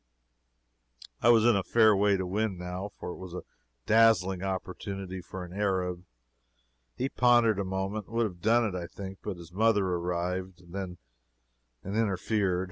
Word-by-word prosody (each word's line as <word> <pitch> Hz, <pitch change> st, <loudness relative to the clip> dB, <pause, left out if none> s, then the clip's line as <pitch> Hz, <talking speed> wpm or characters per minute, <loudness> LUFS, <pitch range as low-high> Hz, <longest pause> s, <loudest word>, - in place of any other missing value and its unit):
I -, -, +4 dB
was 115 Hz, -2 st, +6 dB
in 120 Hz, -2 st, +5 dB
a 100 Hz, -, +2 dB
fair 110 Hz, +3 st, +4 dB
way 100 Hz, 0 st, +3 dB
to 95 Hz, -, -2 dB
win, 100 Hz, +1 st, -1 dB
now, 90 Hz, +3 st, -5 dB
for -, -, -5 dB
it -, -, -8 dB
was 95 Hz, -2 st, -8 dB
a -, -, -5 dB, 0.4 s
dazzling 95 Hz, -5 st, +4 dB
opportunity 95 Hz, 0 st, -4 dB
for 90 Hz, 0 st, -7 dB
an 90 Hz, -, -11 dB
Arab. 95 Hz, -3 st, -1 dB, 0.9 s
He 130 Hz, -, -1 dB
pondered 120 Hz, -5 st, +4 dB
a -, -, 0 dB
moment, 95 Hz, +2 st, -3 dB
and 115 Hz, -, -10 dB
would 115 Hz, 0 st, +3 dB
have 90 Hz, -5 st, -6 dB
done 115 Hz, +4 st, +4 dB
it, 105 Hz, -, -2 dB
I 90 Hz, -2 st, -4 dB
think, 95 Hz, 0 st, -8 dB
but 100 Hz, -4 st, -5 dB
his 85 Hz, -1 st, -12 dB
mother 105 Hz, +1 st, +3 dB
arrived, 90 Hz, 0 st, -3 dB
then, 95 Hz, -2 st, -5 dB, 0.9 s
and 100 Hz, +2 st, -4 dB
interfered. 100 Hz, -3 st, +1 dB
95 Hz, 170 wpm, -29 LUFS, 90-110 Hz, 0.9 s, was